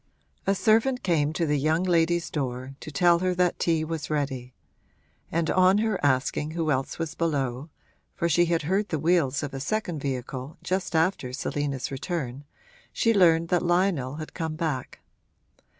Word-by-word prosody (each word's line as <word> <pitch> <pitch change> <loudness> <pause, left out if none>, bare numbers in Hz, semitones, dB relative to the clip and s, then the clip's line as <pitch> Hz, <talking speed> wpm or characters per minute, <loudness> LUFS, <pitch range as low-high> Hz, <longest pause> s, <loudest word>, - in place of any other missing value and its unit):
A 195 - +3
servant 230 +5 +2
came 155 -5 +2
to 165 +1 0
the 150 -2 +1
young 155 +5 +1
lady's 170 -2 +1
door 130 -2 -3
to - - -8
tell 170 +3 +4
her 185 0 0
that 180 -1 +1
tea 165 -2 +1
was 160 -1 -4
ready; 135 -4 -2 0.8
and 165 0 0
on 185 +1 +5
her 220 -4 0
asking 145 +2 +1
who 160 -2 +1
else 135 -1 -1
was 165 -2 -3
below 145 -4 -2 0.5
(for 170 - 0
she 175 +2 +4
had 170 -2 0
heard 195 +6 0
the 160 - 0
wheels 155 -4 +1
of 145 - -5
a 135 - -4
second 175 +2 -2
vehicle 130 +1 -4
just 185 -2 -2
after 160 -6 +1
Selina's 140 0 -3
return), 135 -2 -4 0.5
she 230 -2 +2
learned 165 -4 +4
that 180 - +2
Lionel 175 -7 +1
had 155 0 -7
come 160 -2 -3
back. 155 -6 -3
160 Hz, 165 wpm, -26 LUFS, 140-175 Hz, 0.8 s, on